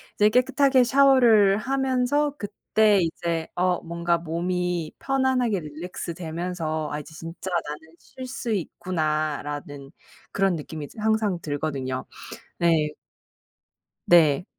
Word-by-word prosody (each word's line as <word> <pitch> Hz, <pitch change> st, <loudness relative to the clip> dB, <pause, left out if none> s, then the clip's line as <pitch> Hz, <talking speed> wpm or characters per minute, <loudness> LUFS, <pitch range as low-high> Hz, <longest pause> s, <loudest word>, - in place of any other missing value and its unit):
이제 210 Hz, 0 st, +4 dB
깨끗하게 260 Hz, +2 st, +3 dB
샤워를 240 Hz, -7 st, +5 dB
하면서 265 Hz, +3 st, 0 dB
그때 210 Hz, 0 st, +2 dB
이제 165 Hz, -1 st, -2 dB
어 180 Hz, 0 st, +1 dB
뭔가 170 Hz, 0 st, -1 dB
몸이 175 Hz, 0 st, -2 dB
편안하게 260 Hz, -6 st, +1 dB
릴랙스되면서 165 Hz, 0 st, -4 dB
'아 150 Hz, -, -3 dB
이제 150 Hz, +2 st, -11 dB
진짜 165 Hz, +3 st, -7 dB, 0.2 s
나는 160 Hz, +2 st, -9 dB
쉴 260 Hz, -, -10 dB
수 250 Hz, -2 st, -4 dB
있구나.'라는 150 Hz, -6 st, -3 dB, 0.4 s
그런 195 Hz, -2 st, +1 dB
느낌이 155 Hz, -1 st, -6 dB
이제 220 Hz, -, -13 dB
항상 215 Hz, -4 st, +1 dB
들거든요. 140 Hz, -4 st, -3 dB, 0.5 s
네. 160 Hz, -3 st, +2 dB, 1.1 s
네. 165 Hz, -2 st, +5 dB
175 Hz, 245 characters per minute, -25 LUFS, 155-220 Hz, 1.1 s, 샤워를